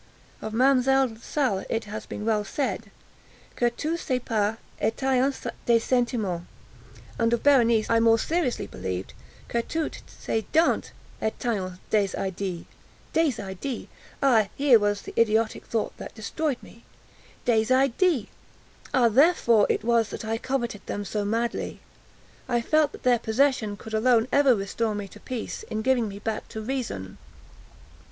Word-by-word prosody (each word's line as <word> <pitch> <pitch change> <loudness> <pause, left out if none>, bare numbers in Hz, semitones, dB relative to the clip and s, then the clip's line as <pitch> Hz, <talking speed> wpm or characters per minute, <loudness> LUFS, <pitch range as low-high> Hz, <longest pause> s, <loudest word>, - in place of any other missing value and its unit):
Of 220 - -4
Mademoiselle 260 0 +3
Salle 230 -4 -1
it 225 - -1
has 210 +1 -7
been 210 - -6
well 215 -2 +2
said, 220 -2 -3 0.7
"Que 240 - +2
tous 315 +8 -3
ses 255 -4 0
pas 215 -1 0 0.2
etaient 265 +4 +1 0.2
des 235 -1 +6
sentiments," 225 -8 0 0.7
and 230 0 +2
of 235 - 0
Berenice 235 -6 +4
I 230 - +3
more 225 0 +5
seriously 315 +1 -1
believed 95 0 -5 0.3
que 235 - 0
toutes 320 +6 -3
ses 220 - -3
dents 325 +2 +3 0.3
etaient 210 -5 -2
des 210 -2 +3
idées. 190 -2 -3 0.5
Des 325 -2 +3
idées!—ah 220 +3 -1
here 270 -5 +6
was 205 -1 0
the - - -8
idiotic 220 -1 +1
thought 225 -2 -2
that - - -9
destroyed 265 +6 -2
me! 230 - -15 0.6
Des 225 -2 +3
idées!—ah, 265 - 0
therefore 235 - +4
it - - 0
was 230 -2 +2
that - - -6
I 225 +1 -1
coveted 240 -6 -2
them 205 - -3
so 205 +2 -2
madly! 230 +3 -2 0.7
I 240 -1 +2
felt 305 +4 +2
that - - -11
their 245 -2 +4
possession 220 -3 +1
could 220 - -10
alone 230 +1 +3
ever 280 -3 +5
restore 210 +2 -2
me 205 -1 -4
to - - -13
peace, 250 -3 -5
in 220 0 -2
giving 250 -3 +2
me 200 -1 -7
back 215 +1 -4
to 220 - -7
reason. 215 - -4
230 Hz, 145 wpm, -26 LUFS, 215-260 Hz, 0.7 s, des